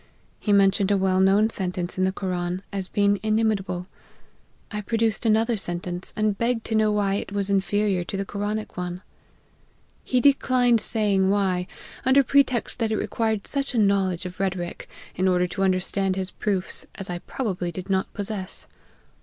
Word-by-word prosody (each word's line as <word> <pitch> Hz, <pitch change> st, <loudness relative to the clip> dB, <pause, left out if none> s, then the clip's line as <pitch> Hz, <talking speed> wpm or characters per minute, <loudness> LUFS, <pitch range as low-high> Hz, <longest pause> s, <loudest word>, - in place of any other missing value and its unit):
He 210 Hz, -, -1 dB
mentioned 200 Hz, 0 st, +4 dB
a 200 Hz, -, +3 dB
well 190 Hz, -1 st, +2 dB
known 200 Hz, +3 st, +4 dB
sentence 180 Hz, -3 st, -3 dB
in 185 Hz, -, +1 dB
the 190 Hz, -, +1 dB
Koran, 180 Hz, -1 st, -3 dB
as 195 Hz, -2 st, -3 dB
being 200 Hz, 0 st, +2 dB
inimitable. 215 Hz, -4 st, 0 dB, 0.9 s
I 210 Hz, -1 st, -3 dB
pro 225 Hz, +3 st, -2 dB
duced 225 Hz, 0 st, +1 dB
another 225 Hz, +1 st, +2 dB
sentence, 175 Hz, -1 st, -3 dB
and 215 Hz, -1 st, +1 dB
begged 235 Hz, -1 st, 0 dB
to -, -, -3 dB
know 215 Hz, -1 st, +3 dB
why 205 Hz, -2 st, +1 dB
it 200 Hz, -, -3 dB
was 200 Hz, -1 st, -1 dB
inferior 195 Hz, -1 st, +1 dB
to 195 Hz, -, -4 dB
the 195 Hz, -, -2 dB
Koranic 210 Hz, +2 st, -4 dB
one. 180 Hz, +1 st, -4 dB, 1.0 s
He 255 Hz, -, +1 dB
declined 250 Hz, -4 st, +3 dB
saying 200 Hz, -4 st, +3 dB
why, 190 Hz, -3 st, +1 dB, 0.4 s
under 265 Hz, +2 st, +5 dB
pretext 265 Hz, -4 st, +2 dB
that 225 Hz, -2 st, 0 dB
it 215 Hz, -, +1 dB
required 220 Hz, -2 st, -1 dB
such 275 Hz, -2 st, -2 dB
a -, -, +1 dB
knowledge 195 Hz, -4 st, +2 dB
of 180 Hz, 0 st, -7 dB
rhetoric, 185 Hz, -3 st, -3 dB, 0.3 s
in 185 Hz, +1 st, +1 dB
order 180 Hz, -1 st, +3 dB
to 180 Hz, +2 st, -5 dB
understand 190 Hz, 0 st, +2 dB
his 190 Hz, -1 st, -3 dB
proofs, 195 Hz, -3 st, -2 dB
as 195 Hz, -, -5 dB
I 175 Hz, -1 st, -4 dB
probably 185 Hz, -6 st, -3 dB
did 185 Hz, +1 st, -7 dB
not 190 Hz, -1 st, 0 dB
possess. 200 Hz, -2 st, -5 dB
200 Hz, 170 wpm, -24 LUFS, 185-215 Hz, 1.0 s, under